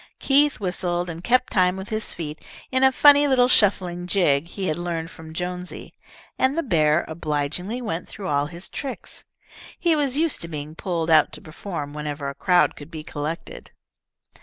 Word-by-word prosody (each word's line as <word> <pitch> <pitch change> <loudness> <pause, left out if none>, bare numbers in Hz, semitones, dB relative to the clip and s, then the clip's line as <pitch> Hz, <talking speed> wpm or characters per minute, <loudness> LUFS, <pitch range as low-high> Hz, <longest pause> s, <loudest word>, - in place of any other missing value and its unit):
Keith 285 +1 +3
whistled 180 -2 -2
and 165 +1 -9
kept 250 +3 +2
time 185 -1 +3
with 190 +1 -7
his 215 0 -3
feet 155 -2 -6 0.3
in 260 0 +2
a 265 - +7
funny 290 +2 +6
little 255 -2 +4
shuffling 180 -6 +2
jig 170 -6 +2
he 190 +2 -5
had 155 - 0
learned 170 -1 -4
from 160 -1 -11
Jonesy, 180 +2 -6 0.5
and 260 +4 +2
the 335 - +1
bear 155 - +2
obligingly 160 - -3
went 170 -6 -4
through 200 -2 -7
all 145 -2 +1
his 170 +4 -8
tricks. 275 -2 -6 0.5
He 340 -2 +3
was 280 -3 +1
used 325 -1 +1
to 165 - -2
being 150 -1 -6
pulled 165 -1 -2
out 155 -2 +5
to - - -2
perform 155 -2 -6
whenever 150 -1 -4
a 140 - -3
crowd 180 +5 +3
could 145 +1 -11
be 160 -2 -7
collected. 155 +1 -6
175 Hz, 180 wpm, -23 LUFS, 155-215 Hz, 0.5 s, a